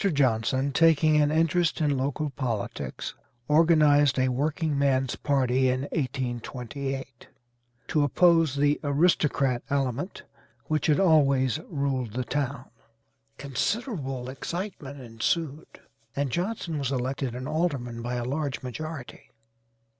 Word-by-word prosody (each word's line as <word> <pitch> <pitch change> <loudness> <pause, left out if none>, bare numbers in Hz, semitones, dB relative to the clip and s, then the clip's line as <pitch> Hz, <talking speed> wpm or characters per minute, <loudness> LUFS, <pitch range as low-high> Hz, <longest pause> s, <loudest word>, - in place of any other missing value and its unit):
Johnson, 130 0 +1
taking 155 0 +4
an 145 - +3
interest 165 +2 +2
in 150 -3 +2
local 140 +3 -2
politics, 120 -6 -4 0.3
organized 150 -3 +5
a 130 0 +2
workingman's 140 -2 0
party 130 -2 +1
in 130 +1 0
1828, 130 0 -4 0.6
to 150 - +1
oppose 165 0 +4
the 145 +1 +2
'aristocrat 145 -4 +2
element,' 140 - -2 0.4
which 155 -2 0
had 150 +1 +3
always 140 -6 +3
ruled 135 - -2
the 125 +1 -1
town. 140 0 -2 0.7
Considerable 140 - -2
excitement 145 0 -6
ensued, 135 +6 -2 0.5
and 140 -2 -1
Johnson 175 - -2
was 135 -2 -2
elected 130 -1 -2
an 130 +1 -5
alderman 140 -7 -2
by 120 +1 -3
a 120 -1 -2
large 140 +1 -3
majority. 145 +1 -7
140 Hz, 110 wpm, -27 LUFS, 130-155 Hz, 0.7 s, organized